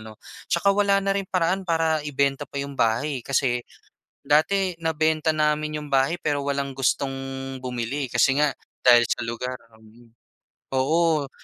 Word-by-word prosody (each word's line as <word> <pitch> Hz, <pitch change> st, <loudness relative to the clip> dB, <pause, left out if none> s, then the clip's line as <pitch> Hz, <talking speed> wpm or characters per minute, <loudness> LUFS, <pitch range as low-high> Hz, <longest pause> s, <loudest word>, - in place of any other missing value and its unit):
ano, 110 Hz, 0 st, -11 dB, 0.4 s
'tsaka 200 Hz, +4 st, +3 dB
wala 200 Hz, -1 st, +3 dB
na 195 Hz, -, +2 dB
rin 200 Hz, -, -1 dB
paraan 185 Hz, +1 st, 0 dB
para 165 Hz, -2 st, +1 dB
ibenta 140 Hz, -1 st, 0 dB
pa -, -, -11 dB
yung 140 Hz, 0 st, -5 dB
bahay 125 Hz, +5 st, 0 dB
eh. -, -, -17 dB
Kasi 130 Hz, -3 st, +1 dB, 0.7 s
dati 180 Hz, +5 st, +2 dB
nabenta 160 Hz, 0 st, +1 dB
namin 150 Hz, 0 st, 0 dB
yung 150 Hz, -, -9 dB
bahay, 135 Hz, +5 st, +2 dB
pero 145 Hz, -2 st, -1 dB
walang 140 Hz, -1 st, -2 dB
gustong 135 Hz, +1 st, 0 dB, 0.5 s
bumili 125 Hz, +2 st, -3 dB
kasi 135 Hz, +3 st, +3 dB
nga 150 Hz, -, +4 dB, 0.4 s
dahil 120 Hz, -1 st, +7 dB
sa -, -, -1 dB
lugar, 125 Hz, +2 st, -4 dB, 0.2 s
mm. 115 Hz, +2 st, -19 dB, 0.6 s
Oo, 155 Hz, +2 st, +2 dB
145 Hz, 150 wpm, -24 LUFS, 130-160 Hz, 0.7 s, dahil